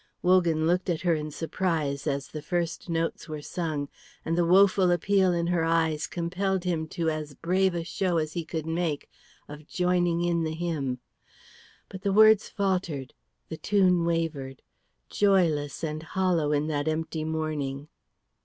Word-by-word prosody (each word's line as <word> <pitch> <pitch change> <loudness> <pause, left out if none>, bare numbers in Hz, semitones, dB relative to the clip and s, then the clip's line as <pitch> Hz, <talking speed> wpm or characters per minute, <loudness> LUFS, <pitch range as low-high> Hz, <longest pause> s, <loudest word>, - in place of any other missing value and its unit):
Wogan 175 -3 +3
looked 180 +3 +1
at 165 -3 0
her 175 -2 +2
in 155 -1 -2
surprise 155 -2 -2
as 140 -1 -1
the 155 - -6
first 170 +2 -3
notes 165 0 -2
were 155 -1 -6
sung, 155 -5 -3 0.4
and 165 - 0
the 175 - +2
woful 190 0 +5
appeal 185 +2 +3
in 170 -1 0
her 170 -1 +1
eyes 160 -2 +1
compelled 180 +2 -2
him 165 -3 -1
to 165 0 -1
as 155 -2 -5
brave 185 +3 +1
a 170 - -2
show 175 +1 -1
as 155 -1 -1
he 170 - -2
could 160 -1 -4
make 160 -2 -2 0.4
of 150 0 -11
joining 175 -1 +1
in 170 -1 +1
the 160 0 -2
hymn. 155 -7 -2 0.9
But 190 - -9
the 200 - 0
words 215 +1 +6
faltered, 180 - -2 0.4
the 160 - -5
tune 185 -3 +3
wavered, 160 -6 -2 0.4
joyless 170 -8 +1
and 155 -1 -3
hollow 170 -2 0
in 145 0 +1
that 150 -1 -2
empty 160 0 -2
morning. 155 -3 -3
165 Hz, 160 wpm, -27 LUFS, 155-180 Hz, 0.9 s, words